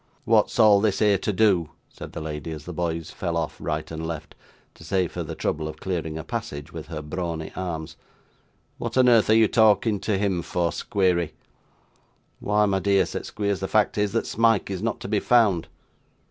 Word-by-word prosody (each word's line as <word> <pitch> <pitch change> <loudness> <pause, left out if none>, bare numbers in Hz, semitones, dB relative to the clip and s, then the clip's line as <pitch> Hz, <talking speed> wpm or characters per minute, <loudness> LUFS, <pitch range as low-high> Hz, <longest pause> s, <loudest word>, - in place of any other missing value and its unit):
'What's - - +3
all 105 -2 +6
this 105 -3 +1
here 105 -3 +3
to 105 - -1
do?' 95 -5 +2 0.2
said - - -11
the - - -5
lady, 75 +1 -5
as 75 -2 -7
the 90 - -6
boys 85 -1 -3
fell 85 -2 -3
off 80 -2 -3
right 75 +1 -3
and 80 0 -5
left, 80 -1 -6 0.4
to - - -15
save 90 +1 -1
her - - -3
the - - -5
trouble 80 0 -2
of 80 - -7
clearing 80 -4 -3
a 80 - -5
passage 70 +1 -6
with 80 -2 -7
her 75 -2 -6
brawny 80 0 -4
arms. 80 -4 -5 0.8
'What - - -3
on 130 -1 +5
earth 115 -3 +5
are 110 - +6
you 110 0 +6
a - - +2
talking 110 -1 +3
to 105 -1 -1
him 95 -3 0
for, 85 0 -1
Squeery!' 90 -2 0 1.1
'Why, 105 +1 +2
my 95 -1 +1
dear,' 100 -1 +3
said 90 - -5
Squeers, 100 -2 -2
'the 95 - -3
fact 105 0 +2
is, 105 -1 +1
that - - 0
Smike 115 -3 +2
is 95 -1 -3
not 115 0 -2
to - - -5
be 105 0 +1
found. 105 -9 +3
95 Hz, 205 wpm, -24 LUFS, 80-105 Hz, 1.1 s, all